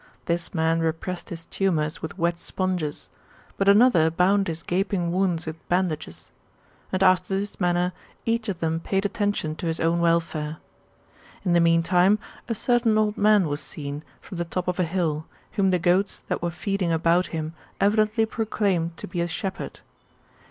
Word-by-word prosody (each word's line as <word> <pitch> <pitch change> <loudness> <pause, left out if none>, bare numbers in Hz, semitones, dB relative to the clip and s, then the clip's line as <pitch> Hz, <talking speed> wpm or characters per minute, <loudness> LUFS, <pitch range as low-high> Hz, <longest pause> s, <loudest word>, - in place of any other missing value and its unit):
This 170 0 -1
man 160 -1 +1
repressed 165 +2 -2
his 170 0 -7
humours 160 -5 0
with 160 - -6
wet 170 -1 0
sponges; 180 -7 -3 0.4
but 195 0 +2
another 200 -6 +6
bound 195 +4 +2
his 165 0 -4
gaping 180 -1 0
wounds 180 -2 0
with 160 0 -8
bandages. 175 -4 -2 0.6
And 185 0 +1
after 185 +1 +3
this 205 +1 -4
manner 180 0 +1 0.3
each 230 -1 0
of 185 - -4
them 165 0 0
paid 195 +4 -1
attention 205 -7 -1
to 170 - -3
his 165 0 -1
own 165 +1 +2
welfare. 165 -2 0 0.9
In 175 - +2
the 170 - +5
meantime, 175 +4 +4 0.3
a 230 - 0
certain 240 -1 +2
old 215 -1 +2
man 210 -4 +4
was 145 0 -3
seen, 145 0 -6 0.2
from 180 - -8
the 170 - -1
top 180 +2 -3
of 180 0 -1
a 180 - +3
hill, 160 -3 -1 0.3
whom 195 -1 +2
the 185 - +3
goats 180 +3 +1
that - - -1
were 175 - 0
feeding 185 0 -1
about 165 +2 +3
him 160 -1 -4 0.3
evidently 215 +2 +3
proclaimed 200 -7 -1
to - - -7
be 175 0 -3
a 170 - 0
shepherd. 185 +3 -5
175 Hz, 170 wpm, -25 LUFS, 165-195 Hz, 0.9 s, another